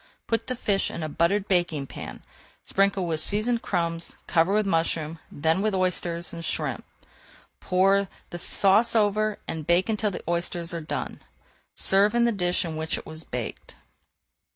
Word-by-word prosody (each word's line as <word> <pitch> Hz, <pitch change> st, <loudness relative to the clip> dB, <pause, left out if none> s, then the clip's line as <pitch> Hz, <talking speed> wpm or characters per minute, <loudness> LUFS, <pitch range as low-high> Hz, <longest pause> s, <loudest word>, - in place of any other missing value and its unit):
Put 230 Hz, -, -1 dB
the 255 Hz, -, -2 dB
fish 200 Hz, -4 st, +1 dB
in 170 Hz, -, -5 dB
a 155 Hz, -, -3 dB
buttered 190 Hz, +6 st, +1 dB
baking 175 Hz, -6 st, +1 dB
pan, -, -, -8 dB, 0.4 s
sprinkle 195 Hz, -1 st, +2 dB
with 160 Hz, -2 st, -1 dB
seasoned 225 Hz, +6 st, +2 dB
crumbs, 170 Hz, -2 st, -2 dB
cover 170 Hz, +2 st, +3 dB
with 210 Hz, +1 st, +3 dB
mushrooms, 165 Hz, -3 st, 0 dB
then 160 Hz, +5 st, +1 dB
with 215 Hz, -1 st, +1 dB
oysters 175 Hz, -2 st, -1 dB
and 165 Hz, 0 st, -6 dB
shrimps. 155 Hz, -, -3 dB, 0.7 s
Pour 195 Hz, +2 st, +3 dB, 0.2 s
the 175 Hz, -, -5 dB
sauce 205 Hz, +6 st, +3 dB
over 215 Hz, 0 st, +2 dB
and 160 Hz, -2 st, -4 dB
bake 175 Hz, +4 st, +3 dB
until 215 Hz, -1 st, +1 dB
the 190 Hz, -, -6 dB
oysters 170 Hz, 0 st, -2 dB
are 170 Hz, -, -3 dB
done. 155 Hz, -, -4 dB, 0.6 s
Serve 200 Hz, +4 st, +4 dB
in 240 Hz, 0 st, +4 dB
the 235 Hz, -, +3 dB
dish 180 Hz, -4 st, 0 dB
in 160 Hz, -2 st, -4 dB
which 160 Hz, 0 st, -1 dB
it -, -, -8 dB
was 160 Hz, 0 st, -8 dB
baked. 120 Hz, -3 st, -6 dB
180 Hz, 165 wpm, -26 LUFS, 165-205 Hz, 0.7 s, Serve